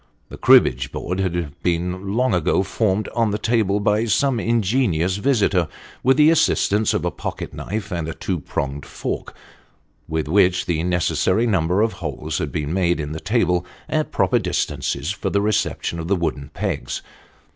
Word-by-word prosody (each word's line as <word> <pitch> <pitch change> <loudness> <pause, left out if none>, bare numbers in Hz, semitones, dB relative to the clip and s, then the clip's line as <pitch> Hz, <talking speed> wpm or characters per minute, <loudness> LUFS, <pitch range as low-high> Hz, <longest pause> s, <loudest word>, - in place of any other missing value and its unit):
The - - -9
cribbage 65 +2 +5
board 90 +2 -3
had 85 -4 -2
been 90 +3 -1
long 130 +1 +2
ago 90 +2 +2
formed 100 +1 0
on 115 -2 +1
the 105 - -1
table 105 -3 +1
by 105 +2 +2
some 125 +2 +2
ingenious 105 -6 +1
visitor 100 - +2 0.3
with 130 +2 +3
the 150 +1 +6
assistance 110 -9 +2
of - - -1
a - - 0
pocket - - -6
knife 105 0 -5
and 85 -3 -2
a 80 - -5
two 90 -3 -2
pronged 70 0 -4
fork, - - -5 0.7
with 80 -1 -2
which 90 +1 +3
the 80 -2 0
necessary 90 +4 +1
number 95 -2 +2
of 115 - 0
holes 75 -6 -4
had - - -3
been 75 +1 -2
made 85 -3 +1
in 75 -1 -4
the 80 - -4
table 100 -4 +1 0.2
at - - -1
proper - - +2
distances 70 +6 -2
for 100 - -3
the 100 - +1
reception 100 -4 -1
of 80 - -4
the 100 - +2
wooden 75 -5 -3
pegs. - - -3
95 Hz, 170 wpm, -21 LUFS, 85-105 Hz, 0.7 s, the